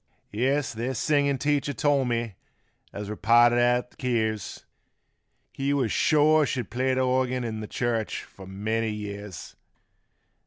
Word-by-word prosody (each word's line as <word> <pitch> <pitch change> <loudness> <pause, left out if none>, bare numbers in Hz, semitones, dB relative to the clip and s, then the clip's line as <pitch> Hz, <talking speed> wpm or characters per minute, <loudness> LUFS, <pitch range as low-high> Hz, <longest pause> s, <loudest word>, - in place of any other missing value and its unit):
Yes, 130 +6 0
th' 120 +3 -3
singin' 140 0 +2
teacher 145 +1 0
told 140 -3 +1
me 115 -2 -2 0.6
as 105 0 -6
we 105 - -4
parted 120 +2 +4
at 125 0 +2
th' - - -25
keers, 110 -5 -2 0.9
He 140 +1 -1
was 130 -6 0
shore 155 -1 +4
she'd 125 -6 -3
play 130 +2 0
th' 130 0 +1
organ 130 0 0
in 110 -2 -4
th' 105 - -7
church 115 -3 -2
'fore 95 -1 -14
many 110 +4 -2
years. 105 -2 -7
120 Hz, 145 wpm, -26 LUFS, 110-135 Hz, 0.9 s, parted